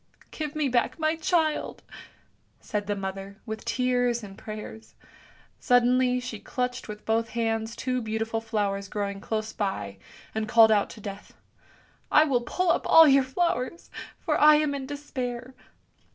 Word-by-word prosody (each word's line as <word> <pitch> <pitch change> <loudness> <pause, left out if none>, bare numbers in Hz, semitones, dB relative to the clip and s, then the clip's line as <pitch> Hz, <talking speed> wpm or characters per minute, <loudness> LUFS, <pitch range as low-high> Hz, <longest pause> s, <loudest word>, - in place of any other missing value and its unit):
" - - -36
" - - -38
Give 305 -1 -5
me 305 -2 +1
back 245 -2 +1
my 315 0 +1
child! 320 -1 0 0.4
" - - -38 0.3
said 205 -1 -4
the 205 - 0
mother, 195 0 -6
with 220 -1 -6
tears 245 -2 +1
and 195 -1 -9
prayers; 215 +1 -9 0.6
suddenly 250 +1 +3
she 245 -4 -6
clutched 250 +2 -3
with 210 -1 -9
both 225 +1 +1
hands 225 0 -1
two 255 +1 -2
beautiful 225 0 -2
flowers 205 -3 -2
growing 200 -1 -4
close 220 0 -3
by, 105 - -3 0.3
and 220 0 -2
called 225 -2 +7
out 205 -2 +3
to - - -11
Death, 200 0 -9 0.4
" - - -29 0.3
I 305 - +7
will 265 -6 +1
pull 350 +8 0
up - - 0
all 325 -1 +8
your 275 -1 +6
flowers, 265 +1 -2 0.3
for 310 -4 -1
I 300 0 +8
am 300 -1 +1
in 270 -2 -5
despair! 255 -3 -5
240 Hz, 165 wpm, -26 LUFS, 215-270 Hz, 0.6 s, all